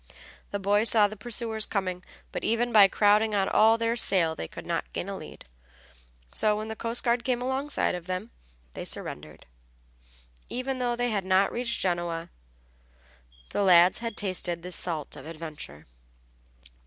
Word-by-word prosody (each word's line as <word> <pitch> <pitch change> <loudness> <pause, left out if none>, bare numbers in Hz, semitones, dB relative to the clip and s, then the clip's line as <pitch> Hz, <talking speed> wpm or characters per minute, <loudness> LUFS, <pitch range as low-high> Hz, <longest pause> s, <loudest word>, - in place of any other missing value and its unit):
The 200 - -2
boys 205 +3 +3
saw 215 -2 +5
the 215 - -8
pursuers 220 0 -2
coming, 185 -3 -2 0.3
but - - -5
even 235 +2 +1
by 210 -3 +8
crowding 210 +2 +3
on 195 -1 +2
all 225 +1 +5
their 230 0 0
sail 185 -8 +3
they 80 - -6
could - - -10
not - - -3
gain - - -3
a - - -4
lead. - - -10 0.9
So 210 -1 +2
when 215 +1 -5
the 220 - -4
coast 230 +1 -1
guard 235 0 +1
came 250 -1 0
alongside 265 +3 -1
of 180 -1 -6
them 185 +5 -4 0.4
they - - -6
surrendered. 75 +1 -6 1.0
Even 255 +1 -3
though 245 -1 0
they 245 0 0
had 200 -3 -1
not 190 +1 +3
reached 240 -1 -2
Genoa, 175 -2 -2 1.2
the - - 0
lads 180 -2 +6
had 230 -1 -5
tasted 180 -4 -2
the 180 - -7
salt 165 -4 -4
of 135 - -10
adventure. 155 - -8
205 Hz, 165 wpm, -27 LUFS, 180-230 Hz, 1.2 s, by